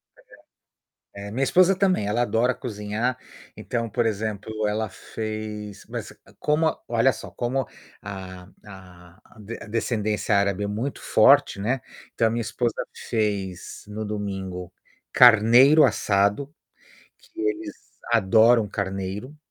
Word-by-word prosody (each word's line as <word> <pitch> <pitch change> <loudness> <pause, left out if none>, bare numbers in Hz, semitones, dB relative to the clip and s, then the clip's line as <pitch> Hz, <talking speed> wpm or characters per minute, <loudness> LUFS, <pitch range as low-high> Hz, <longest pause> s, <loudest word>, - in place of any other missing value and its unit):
Certo. - - -25 0.9
Eh, 100 0 -7
minha 130 +5 -1
esposa 185 +6 +4
também, 185 - +1
ela 115 +4 0
adora 120 +1 +1
cozinhar. 110 +1 -3 0.4
Então, 115 -1 -3
por 120 0 0
exemplo, 110 0 -3 0.2
ela 110 0 -1
fez 110 -2 -7
mas - - -6 0.3
como 155 +1 +1
olha 120 +3 +3
só, - - -10
como 130 +1 -2 0.4
a 95 -2 -8 0.2
a 90 -2 -14
a 110 0 -10
descendência 110 -2 -1
árabe 100 0 +1
é - - -1
muito 115 +7 -4
forte, - - +4
né, 120 +5 -1 0.3
então 115 - +2
a - - +1
minha 115 +1 -2
esposa 120 +2 -2 0.3
fez 100 -6 -3
no 105 +1 -5
domingo, 95 -4 -5 0.4
carneiro 125 +6 +7
assado, 105 +4 +1 0.7
que 335 - -12
eles 335 -5 -2 0.4
adoram 110 +1 +4
carneiro. 100 +7 -4
110 Hz, 125 wpm, -24 LUFS, 100-120 Hz, 0.9 s, carneiro